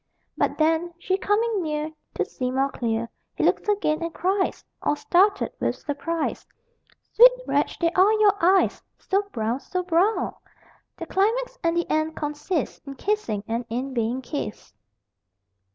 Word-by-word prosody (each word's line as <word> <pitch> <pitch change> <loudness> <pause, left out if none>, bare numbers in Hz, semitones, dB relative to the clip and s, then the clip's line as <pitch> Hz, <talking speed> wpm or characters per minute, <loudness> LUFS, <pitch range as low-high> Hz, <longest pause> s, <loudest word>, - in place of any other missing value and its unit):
_ - - -52 0.3
But - - 0
then, 325 +2 +1
she 370 +2 0
coming 415 +1 +1
near, 305 -1 -2 0.2
To - - 0
see 250 -1 -3
more 270 +2 0
clear, 230 -1 -2 0.3
He - - -1
looks - - +2
again, 345 -6 +1
and 335 0 -2
cries 380 +3 -1 0.2
(All 295 - +1
startled 390 +6 +2
with - - 0
surprise) 320 +2 -3 0.7
Sweet - - +9
wretch, - - 0
they 335 -1 +1
are 375 +4 +5
your 425 -2 +5
eyes, 375 +2 +4 0.2
So 390 +1 0
brown, 225 +3 -1
so 365 +5 -3
brown! 365 +5 +1 0.6
The - - -5
climax - - 0
and 335 0 +1
the 345 - 0
end 310 +1 0
consist 295 +3 -3
In 275 - -6
kissing, 270 - -1
and 230 +2 -1
in 255 +4 -3
being 240 +2 -1
kissed. 245 - -5
335 Hz, 155 wpm, -24 LUFS, 275-390 Hz, 0.7 s, Sweet